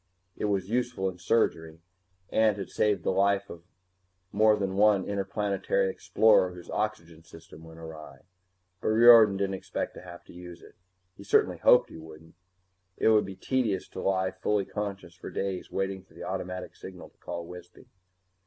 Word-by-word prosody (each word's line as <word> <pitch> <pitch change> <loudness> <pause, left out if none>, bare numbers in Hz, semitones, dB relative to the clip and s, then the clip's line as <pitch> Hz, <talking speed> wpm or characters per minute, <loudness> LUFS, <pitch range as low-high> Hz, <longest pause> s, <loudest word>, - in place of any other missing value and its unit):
It - - -3
was 100 -3 -1
useful 120 -5 -1
in 90 -1 -11
surgery, 80 -5 0 0.5
and 110 -2 +2
had 95 -3 -6
saved 105 -1 0
the - - +1
life 100 +1 +1
of 85 0 -11 0.7
more 110 +1 +4
than 100 -2 -3
one 105 -1 +3
interplanetary 100 -1 -1
explorer 90 0 +3
whose 90 - -11
oxygen 105 -7 -4
system 80 -1 -15
went 80 0 -13
awry. 80 -4 -11 0.6
But - - -3
Riordan 110 -2 +7
didn't 100 0 -1
expect 95 - -5
to - - -11
have 90 -1 -12
to - - -16
use 90 0 -11
it. - - -16 0.4
He 100 - -11
certainly 100 - +2
hoped - - +5
he - - -10
wouldn't. 80 0 -14 0.6
It - - +3
would 110 -2 +3
be 95 - -8
tedious 110 -1 -1
to - - -7
lie 95 -1 0
fully 105 -2 -1
conscious 100 -5 -6
for 85 - -10
days 95 -2 -4
waiting 95 0 -3
for 95 - -25
the - - -9
automatic 90 -1 -5
signal 95 -1 -11
to - - -39
call 85 0 -6
Wisby. 90 0 -13
95 Hz, 170 wpm, -28 LUFS, 85-105 Hz, 0.7 s, Riordan